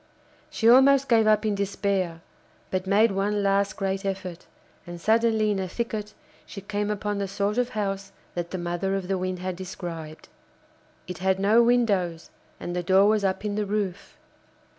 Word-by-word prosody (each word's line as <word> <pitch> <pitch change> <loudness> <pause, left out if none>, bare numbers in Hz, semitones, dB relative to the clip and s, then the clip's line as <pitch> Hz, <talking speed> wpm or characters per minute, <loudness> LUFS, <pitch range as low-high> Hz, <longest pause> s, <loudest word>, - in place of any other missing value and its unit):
She 225 - 0
almost 270 +3 +6
gave 225 -2 +4
up 215 0 +3
in 215 - +1
despair, 195 -4 -1 0.5
but 185 0 -2
made 210 +3 +4
one 200 +1 0
last 200 0 +1
great 195 0 -2
effort, 190 -3 -5 0.4
and 175 0 -7
suddenly 220 +1 +2
in 200 - -1
a 190 - -2
thicket 215 +1 -4 0.3
she 200 - -9
came 205 +1 -3
upon 205 0 -2
the 200 - -2
sort 200 +4 -1
of 250 0 0
house 195 -1 -3 0.2
that 175 -1 -4
the 185 - -4
mother 175 +2 -2
of 190 -2 -3
the 195 0 0
Wind 185 0 -2
had 185 0 -4
described. 170 -4 -7 0.8
It 180 -1 -7
had 190 0 +1
no 210 +4 +5
windows, 205 -9 +1 0.3
and 175 - -5
the 180 - 0
door 190 +3 +4
was 215 -1 +2
up 195 +2 -1
in 210 - -1
the 210 0 -1
roof. 200 -3 -3
195 Hz, 180 wpm, -25 LUFS, 185-210 Hz, 0.8 s, almost